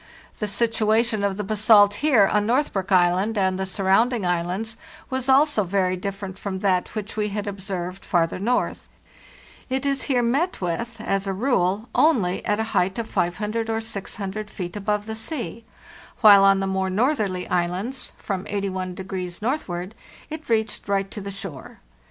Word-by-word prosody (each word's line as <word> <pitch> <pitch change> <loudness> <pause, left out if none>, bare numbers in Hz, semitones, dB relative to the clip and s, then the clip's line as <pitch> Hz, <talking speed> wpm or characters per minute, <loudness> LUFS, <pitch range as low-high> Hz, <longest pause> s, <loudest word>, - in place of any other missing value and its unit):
The 210 - -1
situation 220 0 +1
of 200 -1 0
the 210 - -2
basalt 205 0 +5
here 270 -9 +5
on 210 +1 +2
Northbrook 230 -7 0
Island 185 +4 +3
and 190 -1 +1
the 190 - -2
surrounding 200 +4 +2
islands 180 +6 -2 0.3
was 260 -1 -1
BASALTIC - - +5
ROCK 265 - +8
also 295 -8 +2
very 185 0 +1
different 195 0 -6
from 190 -2 -4
that 185 -1 0
which 215 -1 -5
we 210 -1 0
had 205 +1 -3
observed 190 -2 -5
far 175 -2 +2
ther 165 - -6
north. 235 +6 -1 0.8
It 265 +2 -1
is 275 -1 0
here 250 -3 +3
met 285 +10 0
with, 225 +6 -3
as 195 -2 -1
a 195 - 0
rule, 210 -2 +1
only 215 - +2
at 210 +1 +1
a - - +1
height 185 +3 +1
of 230 -1 -4
500 210 +6 -1
or 225 0 0
600 210 -1 -4
feet 180 -3 -6
above 210 0 -1
the 220 - -5
sea, 230 -1 -5 0.6
while 200 -3 +8
cn 195 0 +5
the - - 0
more 190 0 -1
northerly 205 -4 0
islands—from 185 +2 -3
81° 185 -2 -4
northward—it 230 - -5
reached 220 -2 0
right 195 -1 0
to 210 - -6
the 200 - -6
shore. 195 -8 -8
205 Hz, 165 wpm, -23 LUFS, 190-225 Hz, 0.8 s, ROCK